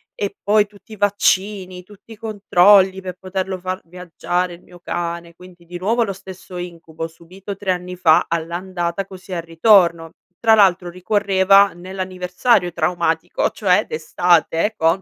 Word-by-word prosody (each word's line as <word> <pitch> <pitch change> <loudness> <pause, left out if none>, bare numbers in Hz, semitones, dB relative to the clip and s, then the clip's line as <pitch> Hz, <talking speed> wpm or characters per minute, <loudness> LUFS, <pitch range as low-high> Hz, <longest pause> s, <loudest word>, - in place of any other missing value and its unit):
e 200 -1 -4
poi 210 0 +3
tutti 205 +1 -21
i - - -8
vaccini, 195 -2 0
tutti 205 +3 -18
i - - -9
controlli, 200 -3 +3
per 185 -1 -7
poterlo 190 0 -4
far 185 +1 -4
viaggiare 180 +1 -3
il 170 - -13
mio 175 -1 -17
cane, 170 -1 -5
quindi 180 0 -17
di 175 +1 -8
nuovo 230 +5 +1
lo 200 -3 -3
stesso 185 -1 -11
incubo, 165 -2 -7
subito 185 +5 -10
3 195 -1 -2
anni 180 0 -4
fa, 165 -3 +4
all'andata, 175 +2 -3
così 190 0 -10
al 170 - -2
ritorno. 170 -1 +3 0.3
Tra 225 -1 +4
l'altro 190 -4 +4
ricorreva 195 +1 +3
nell'anniversario 185 +2 -1
traumatico, 170 0 -1
cioè 195 0 +1
d'estate 170 +4 +1
con 165 +4 +2
185 Hz, 150 wpm, -19 LUFS, 175-195 Hz, 0.3 s, fa